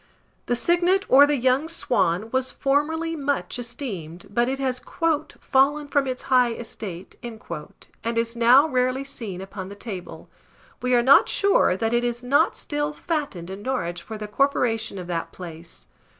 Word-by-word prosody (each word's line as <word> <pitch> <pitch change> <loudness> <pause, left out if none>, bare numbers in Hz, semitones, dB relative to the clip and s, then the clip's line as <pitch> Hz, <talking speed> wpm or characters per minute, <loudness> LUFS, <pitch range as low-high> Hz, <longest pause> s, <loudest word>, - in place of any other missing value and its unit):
The 245 - +1
Cygnet, 350 - +2
or 280 +2 +8
the 295 - +2
young 260 +5 +2
Swan, 220 - 0
was 260 0 0
formerly 320 +4 0
much 285 -3 -2
esteemed; 205 - -6
but 240 +4 +1
it 270 - -2
has 260 -2 -2 0.6
"fallen 290 +2 +2
from 285 -2 +1
its 255 -1 -4
high 250 -2 +3
estate," 200 -6 -8
and 235 -2 -8 0.8
is 230 0 0
now 245 +6 +6
rarely 255 -1 0
seen 225 -9 -7
upon 190 0 -7
the 200 - -9
table. 200 -4 -8 0.5
We 250 0 +2
are 240 - +4
not 270 +3 +6
sure 395 - +3
that 225 +3 -1
it 240 0 +2
is 240 0 -2
not 285 +7 +3
still 295 0 -2
fattened 290 - -4
in 195 +1 -7
Norwich 175 -9 -2
for 220 - -8
the 210 0 -6
corporation 225 -3 0
of 180 - -6
that 170 -1 -3
place. 165 - -9
245 Hz, 165 wpm, -24 LUFS, 205-280 Hz, 0.8 s, or